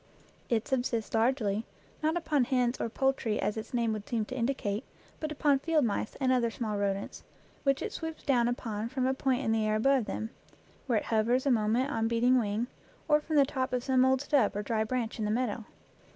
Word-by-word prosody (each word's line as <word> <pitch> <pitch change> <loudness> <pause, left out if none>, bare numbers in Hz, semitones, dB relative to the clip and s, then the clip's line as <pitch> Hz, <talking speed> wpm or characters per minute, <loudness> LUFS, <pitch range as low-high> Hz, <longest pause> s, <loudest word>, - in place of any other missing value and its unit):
It 230 -2 +1
subsists 245 -4 -1
largely, 225 -3 +1 0.4
not 315 +2 +1
upon 300 -6 +1
hens 250 -1 +1
or - - -1
poultry 265 -3 0
as 205 +2 0
its 220 - -6
name 235 -3 +1
would 210 -1 -6
seem 225 -3 0
to 255 - -7
in 235 -2 +1
dicate, 215 -6 -2 0.4
but 310 -1 -3
upon 290 -2 +2
field 310 -1 +2
mice 210 -1 -2
and 260 -2 +2
other 245 -2 +2
small 220 -2 -3
rodents, 200 0 -2 0.4
which 275 -1 +1
it - - -3
swoops 320 -1 -6
down 245 -5 +3
upon 225 -2 -3
from 260 0 -1
a 260 - +2
point 265 -1 0
in 225 - +1
the 225 -1 +2
air 215 0 +1
above 260 +2 +3
them, 220 +2 -4 0.6
where 240 -4 +2
it - - -2
hovers 235 +4 +1
a 275 - +3
moment 235 +4 +2
on 225 -3 0
beating 240 +2 +3
wing, 215 +1 -1 0.4
or 300 -1 +4
from 310 +1 -3
the 285 -2 +6
top 260 -2 -2
of 250 -1 0
some 260 -1 +3
old 260 0 +3
stub 285 -8 +2
or 205 - -2
dry 220 +1 0
branch 235 0 -2
in 215 - 0
the - - -1
meadow. 230 -1 -1
245 Hz, 220 wpm, -30 LUFS, 220-265 Hz, 0.6 s, the